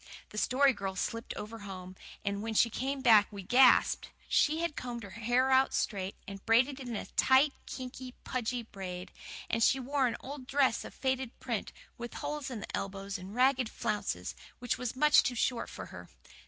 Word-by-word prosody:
The 210 Hz, -, -4 dB
Story 270 Hz, +3 st, +4 dB
Girl 195 Hz, -4 st, -4 dB
slipped 230 Hz, +5 st, -3 dB
over 225 Hz, +2 st, -7 dB
home, 185 Hz, -2 st, -8 dB, 0.3 s
and 200 Hz, 0 st, -1 dB
when 220 Hz, 0 st, -4 dB
she 235 Hz, +2 st, +4 dB
came 270 Hz, +4 st, -2 dB
back 215 Hz, -5 st, +7 dB
we 200 Hz, -2 st, -7 dB
gasped. 250 Hz, +6 st, +5 dB, 0.2 s
She 315 Hz, +2 st, +3 dB
had 340 Hz, -3 st, -1 dB
combed 240 Hz, -2 st, -5 dB
her 200 Hz, -, -9 dB
hair 245 Hz, +4 st, +1 dB
out 265 Hz, 0 st, +4 dB
straight, 195 Hz, -2 st, -1 dB
and 195 Hz, -1 st, -8 dB
braided 255 Hz, +5 st, +3 dB
it 260 Hz, -, -7 dB
in 235 Hz, -, -3 dB
a -, -, -4 dB
tight, 270 Hz, +2 st, +4 dB
kinky, 255 Hz, 0 st, -7 dB
pudgy 245 Hz, -1 st, -2 dB
braid; 185 Hz, -4 st, -7 dB, 0.4 s
and 230 Hz, -, -1 dB
she 265 Hz, -, +4 dB
wore 265 Hz, +1 st, +1 dB
an 235 Hz, -, -2 dB
old 270 Hz, -1 st, -8 dB
dress 275 Hz, -3 st, +2 dB
of -, -, -10 dB
faded 260 Hz, -2 st, -2 dB
print, 235 Hz, -5 st, -3 dB, 0.3 s
with 240 Hz, 0 st, -6 dB
holes 295 Hz, -2 st, -4 dB
in 235 Hz, -5 st, -5 dB
the -, -, -5 dB
elbows 195 Hz, 0 st, -4 dB
and 190 Hz, +3 st, -9 dB
ragged 255 Hz, -1 st, +3 dB
flounces, 215 Hz, -3 st, -2 dB, 0.2 s
which 245 Hz, -1 st, -1 dB
was 250 Hz, -1 st, -3 dB
much 300 Hz, +3 st, +6 dB
too 245 Hz, -, -2 dB
short 240 Hz, +1 st, 0 dB
for -, -, -7 dB
her. -, -, -10 dB
240 Hz, 195 wpm, -31 LUFS, 210-260 Hz, 0.4 s, back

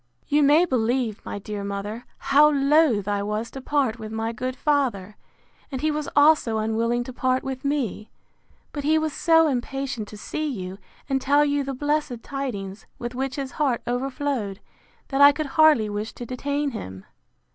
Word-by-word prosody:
You 295 Hz, +1 st, +3 dB
may 295 Hz, +5 st, +5 dB
believe, 240 Hz, -, 0 dB
my -, -, -5 dB
dear 205 Hz, 0 st, -5 dB
mother, 200 Hz, +4 st, -5 dB
how 290 Hz, +2 st, +5 dB
loath 280 Hz, -7 st, +3 dB
I 205 Hz, -1 st, 0 dB
was 210 Hz, +3 st, -3 dB
to 270 Hz, -, -8 dB
part 260 Hz, -5 st, 0 dB
with 215 Hz, -1 st, -7 dB
my 225 Hz, +1 st, -2 dB
good 255 Hz, +3 st, -4 dB
father; 245 Hz, -10 st, 0 dB, 0.6 s
and 265 Hz, -, -4 dB
he 310 Hz, 0 st, +1 dB
was 300 Hz, -1 st, -3 dB
also 290 Hz, -6 st, +4 dB
unwilling 230 Hz, +2 st, 0 dB
to 255 Hz, -, -8 dB
part 255 Hz, +1 st, 0 dB
with 265 Hz, -1 st, -5 dB
me; 270 Hz, -7 st, -2 dB, 0.6 s
but 290 Hz, -, -5 dB
he 310 Hz, +2 st, +3 dB
was 315 Hz, -1 st, -1 dB
so 325 Hz, -1 st, +4 dB
impatient 270 Hz, -3 st, -3 dB
to 210 Hz, -, -10 dB
see 310 Hz, +8 st, -3 dB
you, 190 Hz, -7 st, -5 dB, 0.3 s
and 270 Hz, -2 st, 0 dB
tell 285 Hz, +2 st, +4 dB
you 285 Hz, -1 st, 0 dB
the 275 Hz, 0 st, -4 dB
blessed 290 Hz, -4 st, -1 dB
tidings, 220 Hz, -8 st, -5 dB
with 240 Hz, 0 st, -5 dB
which 265 Hz, +1 st, -3 dB
his 275 Hz, -2 st, -4 dB
heart 275 Hz, -6 st, 0 dB
overflowed, 250 Hz, -4 st, -2 dB, 0.5 s
that 275 Hz, 0 st, 0 dB
I 285 Hz, 0 st, +10 dB
could 305 Hz, +2 st, -3 dB
hardly 310 Hz, -9 st, +5 dB
wish 210 Hz, +1 st, -4 dB
to 240 Hz, -, -8 dB
detain 285 Hz, +4 st, -2 dB
him. 95 Hz, -, -8 dB
260 Hz, 180 wpm, -24 LUFS, 220-285 Hz, 0.6 s, I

